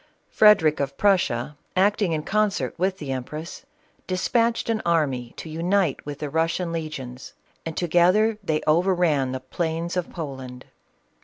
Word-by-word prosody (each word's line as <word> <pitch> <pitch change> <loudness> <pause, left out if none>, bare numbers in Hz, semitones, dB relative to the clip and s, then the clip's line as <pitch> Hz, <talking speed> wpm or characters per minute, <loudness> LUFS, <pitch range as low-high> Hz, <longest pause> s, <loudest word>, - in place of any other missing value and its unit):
Frederic 165 -8 +5
of 140 -1 -3
Prussia, 150 -9 +1 0.2
acting 200 0 +2
in 155 -1 -1
concert 200 -10 0
with 185 +1 0
the 145 -6 -5
empress, 155 - -6 0.4
despatched 230 +5 +1
an 225 -1 0
army 140 -8 0
to - - -7
unite 170 0 0
with 145 -1 -5
the 150 0 -4
Russian 165 +2 0
legions, 135 -6 -6 0.3
and 160 - -6
together 180 +6 +3
they 155 -4 0
over 175 +5 +3
ran 150 -7 +1
the 130 - -3
plains 165 +6 -3
of 180 -2 -2
Poland. 130 -6 -7
165 Hz, 145 wpm, -24 LUFS, 145-185 Hz, 0.4 s, Frederic